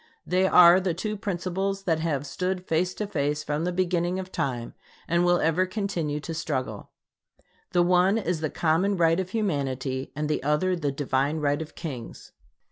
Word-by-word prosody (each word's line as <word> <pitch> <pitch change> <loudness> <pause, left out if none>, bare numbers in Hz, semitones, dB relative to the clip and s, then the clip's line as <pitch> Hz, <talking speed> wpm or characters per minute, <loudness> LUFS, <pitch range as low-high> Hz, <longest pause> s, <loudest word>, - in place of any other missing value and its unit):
They 185 +2 +2
are 180 0 +8
the 185 -3 -1
two 215 +4 -3
principles 195 0 -2
that 165 -4 +1
have 150 -4 -1
stood 185 +5 -3
face 180 +3 0
to 210 - -3
face 150 -6 -1
from 150 +2 -2
the 180 - 0
beginning 175 0 0
of 185 0 -6
time; 120 -3 -3 0.3
and 170 +1 +2
will 175 0 +3
ever 165 +3 +2
continue 180 -7 -2
to 165 +3 -5
struggle. 150 -5 -3 0.8
The 175 - +3
one 180 +3 +3
is 175 -6 -1
the 155 - -1
common 175 +7 +1
right 165 0 +3
of 185 -1 -3
humanity 135 - -2
and 150 +1 -2
the 150 - -1
other 150 +7 +1
the 150 -5 -1
divine 140 +2 0
right 145 0 0
of 160 - -8
kings. 135 -9 -7
170 Hz, 180 wpm, -26 LUFS, 150-185 Hz, 0.8 s, are